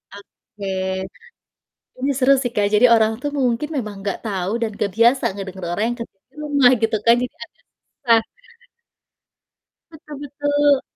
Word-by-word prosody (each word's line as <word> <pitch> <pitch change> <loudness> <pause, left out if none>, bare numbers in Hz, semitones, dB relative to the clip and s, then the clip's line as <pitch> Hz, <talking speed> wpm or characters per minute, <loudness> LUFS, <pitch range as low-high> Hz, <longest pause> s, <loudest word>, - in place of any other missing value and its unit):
Oke. 200 0 -13 1.3
Ini 275 +2 0
seru 270 0 +5
sih 245 -2 -2
Kak, 205 -1 +2
jadi 220 +4 +6
orang 220 -1 +4
tuh 290 - -2
mungkin 250 +3 0
memang 210 -5 -4
nggak 200 -1 -3
tahu 190 -2 -2
dan 230 - 0
nggak 200 -2 -2
biasa 235 +4 +4
ngedenger 190 -2 -7
orang 205 - -1
yang 240 - -3
kerja 230 -4 -8
di - - -30
rumah 285 -4 +4
gitu 225 0 +1
kan, 235 - +7
jadi 250 - -5
agak - - -19 0.3
susah. 230 -4 +2 1.7
Betul 300 -2 -11
betul. 290 0 +1
235 Hz, 155 wpm, -20 LUFS, 210-280 Hz, 1.7 s, kan